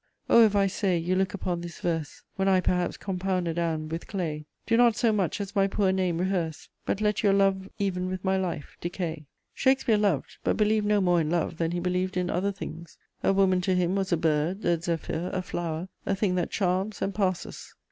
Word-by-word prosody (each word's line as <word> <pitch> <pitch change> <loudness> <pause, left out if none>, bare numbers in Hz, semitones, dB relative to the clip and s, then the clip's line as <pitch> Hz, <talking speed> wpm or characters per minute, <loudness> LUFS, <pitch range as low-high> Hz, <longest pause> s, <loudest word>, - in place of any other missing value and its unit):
O, 235 - +8
if, 210 -2 +3
I 200 -1 +4
say, 190 -1 0
you 170 +2 -1
look 190 +1 +1
upon 180 -3 -2
this 175 0 -8
verse 165 -4 -3
When 195 0 0
I 190 -1 +5
perhaps 180 -1 0
compounded 180 -3 -2
am 160 -2 -1
with 165 +2 -5
clay, 155 -6 -3 0.2
Do 230 - +2
not 235 -1 +5
so 225 0 +2
much 195 -4 0
as 200 +1 -5
my 195 -1 +4
poor 195 -1 +1
name 185 -3 0
rehearse, 175 -3 -2 0.2
But 200 - -1
let 210 -1 +1
your 200 -2 +4
love 195 -1 +2
even 185 -3 -1
with 185 0 -5
my 190 0 +2
life 180 -6 -3
decay. 165 -4 -4 0.3
Shakespeare 260 -4 +3
loved, 195 -10 0
but - - +1
believed 215 0 +2
no 210 -1 +3
more 175 -2 +3
in 155 - -1
love 165 -1 -1
than 165 -1 0
he 175 +1 -2
believed 180 +1 -1
in 180 0 0
other 195 +3 0
things: 170 -4 -8 0.3
a - - +4
woman 190 -2 +3
to 185 0 +1
him 180 0 +1
was 195 -1 -1
a 170 - +3
bird, 160 +5 0
a 170 -2 +2
zephyr, 170 0 -2
a 185 - -1
flower, 170 -1 -3 0.2
a 195 - 0
thing 195 -1 0
that 180 -2 0
charms 190 +1 -1
and 195 - -1
passes. 190 -3 -3
185 Hz, 220 wpm, -27 LUFS, 170-195 Hz, 0.3 s, O